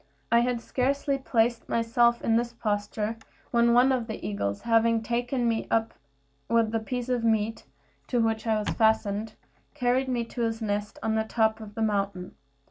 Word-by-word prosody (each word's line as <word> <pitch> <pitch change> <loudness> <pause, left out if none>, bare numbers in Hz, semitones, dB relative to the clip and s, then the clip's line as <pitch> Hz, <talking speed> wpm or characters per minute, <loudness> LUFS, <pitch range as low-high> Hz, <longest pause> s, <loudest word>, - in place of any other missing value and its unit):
I 235 - +6
had 240 0 0
scarcely 275 +2 0
placed 235 -2 0
myself 235 +1 +2
in 225 - +2
this 235 +1 0
posture 210 0 -2 0.3
when 235 0 +4
one 250 +3 +5
of 250 -3 0
the 220 - -6
eagles, 100 -1 -2
having 230 -1 +2
taken 245 +2 -1
me 225 -1 -1
up 225 0 +1 0.6
with 230 -1 +2
the 225 - 0
piece 245 +2 -4
of 250 -2 0
meat 220 -1 0 0.4
to 245 - 0
which 225 0 0
I 220 -1 +2
was 210 - -2
fastened, 220 -1 +1 0.4
carried 255 -1 +1
me 245 -2 -1
to 240 - -6
his 225 -1 -1
nest 205 -2 -3
on 220 - 0
the 220 0 +1
top 220 0 +1
of 210 -2 -10
the 225 - -1
mountain. 200 -3 -1
230 Hz, 180 wpm, -27 LUFS, 220-240 Hz, 0.6 s, I